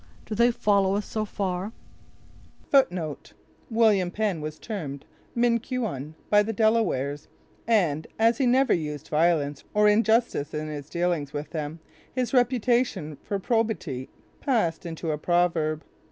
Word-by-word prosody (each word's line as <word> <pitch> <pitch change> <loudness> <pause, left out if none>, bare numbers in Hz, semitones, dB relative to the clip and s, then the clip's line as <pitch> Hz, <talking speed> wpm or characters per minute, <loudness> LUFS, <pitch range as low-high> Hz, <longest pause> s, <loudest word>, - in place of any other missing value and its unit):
Do - - -5
they 235 +3 +4
follow 200 -4 +2
us 205 - -1
so 215 -1 -2
far?" 195 0 -3 2.0
William 220 -6 +3
Penn 200 -4 -1
was 155 0 -5
termed 150 -10 -6 0.3
Minquon 235 - -1 0.2
by 210 0 +7
the 215 +2 -1
Delawares, 200 - +1 0.4
and, 165 -9 +2
as 230 +1 +3
he 265 - +3
never 260 +2 +4
used 150 -3 -3
violence 150 -3 +1
or 210 0 +5
injustice 220 -8 +2
in 155 0 -3
his 145 -1 -7
dealings 170 -5 -1
with 145 +1 -5
them, 155 0 -5 0.3
his 255 -1 -2
reputation 240 - +1
for 200 - -3
probity 195 - -1 0.3
passed 175 - 0
into 165 -1 -3
a 150 - -2
proverb. 165 -2 +1
190 Hz, 130 wpm, -26 LUFS, 155-225 Hz, 2.0 s, by